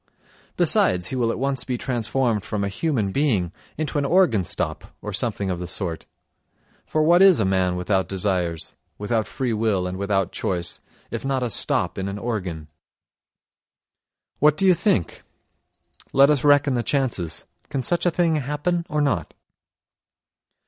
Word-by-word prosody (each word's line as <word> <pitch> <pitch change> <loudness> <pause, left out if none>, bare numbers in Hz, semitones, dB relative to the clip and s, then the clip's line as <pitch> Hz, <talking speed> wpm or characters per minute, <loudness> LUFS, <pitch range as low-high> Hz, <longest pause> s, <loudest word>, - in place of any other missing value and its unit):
Besides, 90 -1 +2
he - - -4
will 120 -3 +1
at - - -2
once 135 0 -1
be 125 -2 -3
transformed 120 -3 -1
from 105 -1 -3
a 100 - -1
human 110 -3 -1
being 105 - +1 0.3
into 150 -1 -1
an - - 0
organ 145 - +3
stop - - -3
or - - -6
something 100 -2 -1
of 90 - -3
the 90 - -5
sort; 85 -2 -4 0.8
for 155 - +1
what 170 +3 +5
is 195 -3 +7
a 110 - +2
man 95 -1 +1
without 95 +1 0
desires, 90 -4 -1 0.2
without 105 0 -1
free 125 0 -2
will 105 -4 0
and 90 +1 -4
without 100 -2 0
choice, 85 -2 -1 0.3
if - - -4
not 135 -1 -1
a 120 - -1
stop - - +1
in 95 - -2
an 100 +1 -4
organ? 95 -9 -4 1.7
What 150 +1 +4
do 195 - +2
you 185 - +7
think? 170 - 0 0.9
Let 140 +2 +6
us 145 -4 +1
reckon 145 -1 +4
the 120 - +1
chances—can 115 - -2
such 175 +3 +1
a - - +6
thing 165 -2 +1
happen 150 +5 -2
or 150 -3 0
not? 135 - -1
115 Hz, 160 wpm, -23 LUFS, 95-145 Hz, 1.7 s, is